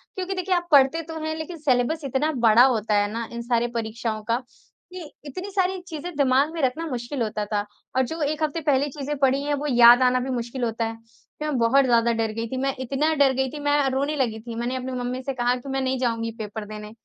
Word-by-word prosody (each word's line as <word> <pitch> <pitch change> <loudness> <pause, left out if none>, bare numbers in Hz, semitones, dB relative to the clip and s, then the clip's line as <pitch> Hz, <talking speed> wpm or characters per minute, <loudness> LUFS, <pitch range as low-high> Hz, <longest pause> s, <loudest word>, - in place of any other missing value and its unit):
क्योंकि 375 0 -3
देखिए 370 0 0
आप 350 0 -1
पढ़ते 285 +3 +5
तो 320 0 -7
हैं, 315 0 -2
लेकिन 330 +2 -6
सिलेबस 285 +2 +1
इतना 275 +4 0 0.2
बड़ा 225 +3 +7
होता 225 -5 +1
है 205 0 +2
ना, 230 +1 -4
इन 235 0 -5
सारे 235 0 +1
परीक्षाओं 220 -1 -3
का 230 +3 0 0.5
कि 350 -5 -8
इतनी 365 +8 -6
सारी 375 -1 0
चीज़ें 325 +2 -6
दिमाग 280 +2 +3
में 330 - -3
रखना 280 +5 0
मुश्किल 245 0 -4
होता 210 -1 -2
था 205 -1 0 0.3
और 260 - +4
जो 320 +6 -6
1 300 +1 -1
हफ्ते 310 +2 -1
पहले 285 -2 +2
चीज़ें 290 +1 -4
पढ़ी 270 0 +2
हैं 290 0 -1
वो 295 +1 -3
याद 240 -1 +7
आना 255 0 +3
भी 255 +2 -4
मुश्किल 245 0 -3
होता 230 0 -1
है। 225 0 -4
तो 230 +6 -12
मैं 300 -3 -1
बहुत 255 +4 +4
ज़्यादा 235 -1 +3
डर 225 -1 -1
गई 230 +1 -4
थी, 260 - -5
मैं 270 +1 -1
इतना 275 +5 0
डर 275 -2 +4
गई 265 0 0
थी 300 - -7
मैं 290 -1 +2
रोने 280 +3 -1
लगी 240 -6 -1
थी, 230 +1 -8
मैंने 240 +2 -2
अपनी 260 0 -4
मम्मी 250 0 -3
से 275 - -2
कहा 245 -1 +1
कि 255 +2 -8
मैं 270 0 -1
नहीं 260 0 0
जाऊँगी 230 -2 -1
पेपर 210 0 -6
देने। 210 0 -8
260 Hz, 245 wpm, -24 LUFS, 235-295 Hz, 0.5 s, बड़ा